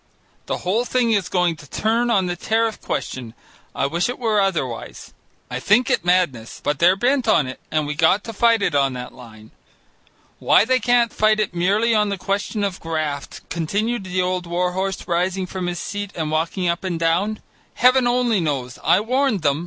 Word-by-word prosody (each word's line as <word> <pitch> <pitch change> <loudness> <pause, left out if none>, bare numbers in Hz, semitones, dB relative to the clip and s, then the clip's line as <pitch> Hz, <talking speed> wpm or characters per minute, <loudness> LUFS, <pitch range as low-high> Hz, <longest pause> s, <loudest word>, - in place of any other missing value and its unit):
The - - -1
whole 210 +7 +1
thing 245 -1 +1
is 200 -4 +1
going 180 -3 +1
to 150 -1 -14
turn 230 +3 0
on 195 -5 +2
the 175 -1 -2
tariff 225 +4 -1
question. 120 -3 -4 0.4
I - - 0
wish 170 +9 0
it 245 - -4
were 220 -4 +1
otherwise. 155 -12 -3 0.3
I 125 - -4
think 215 - +3
it 190 - +1
madness, 175 -11 0
but 145 -1 -2
they're 180 +2 +5
bent 250 +3 +1
on 165 -9 +4
it, 130 0 -7
and 155 -1 0
we 150 - -3
got 165 +7 +3
to 225 - -7
fight 230 0 +3
it 180 - 0
on 140 -2 +2
that 125 0 -7
line. 110 -3 -14 0.9
Why - - +4
they 255 +2 +2
can't 240 -1 +2
fight 215 0 +2
it 210 -4 -1
merely 200 +7 +2
on 210 -1 +2
the 200 - -2
question 200 +3 -2
of 195 -2 -2
graft," 155 -3 -4
continued 200 +7 -1
the 185 0 -1
old 180 -1 -2
war 180 +1 0
horse, 190 0 -3
rising 185 +2 0
from 185 -1 -5
his 175 0 -3
seat 205 +3 -5
and 155 -2 -3
walking 165 +4 -1
up 170 +2 -1
and 180 -3 -3
down, 180 +6 0 0.4
"Heaven 250 0 +4
only 240 -3 +2
knows. 135 -5 -3
I 190 - +4
warned 250 - 0
them. 145 0 +2
185 Hz, 200 wpm, -21 LUFS, 165-215 Hz, 0.9 s, they're